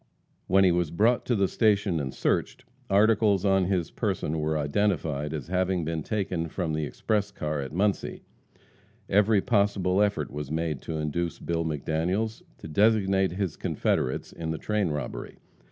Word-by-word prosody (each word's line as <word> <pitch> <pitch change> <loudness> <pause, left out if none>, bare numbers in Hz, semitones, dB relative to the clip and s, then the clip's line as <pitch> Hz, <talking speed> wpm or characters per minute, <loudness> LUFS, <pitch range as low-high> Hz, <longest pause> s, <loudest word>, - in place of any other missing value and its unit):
When 95 +1 +5
he 95 - +5
was 85 -2 +1
brought 115 +8 +2
to 120 - +2
the 100 -2 +2
station 100 -6 +2
and 65 -3 -3
searched, - - -1 0.2
articles 105 -1 +3
on 95 -1 +3
his 90 -3 -1
person 80 +1 -2
were 75 0 0
identified 75 -2 0
as 80 -3 -4
having 90 -1 0
been 80 0 -2
taken 90 -3 -2
from 85 -2 -2
the 75 -1 -1
express 105 +6 -1
car 75 -6 -3
at 70 - -6
Muncie. 100 +5 -1 0.8
Every 105 +1 +4
possible 100 -3 +2
effort 100 -9 0
was 75 0 -5
made 80 -2 -2
to 80 - -4
induce 80 +2 -2
Bill 85 -1 -2
McDaniels 80 +8 -1 0.2
to - - -9
designate 95 0 +3
his 95 -4 -2
confederates 65 - -1
in 80 -1 -5
the 80 - -2
train 105 +2 0
robbery. 75 -3 -5
90 Hz, 160 wpm, -27 LUFS, 80-100 Hz, 0.8 s, When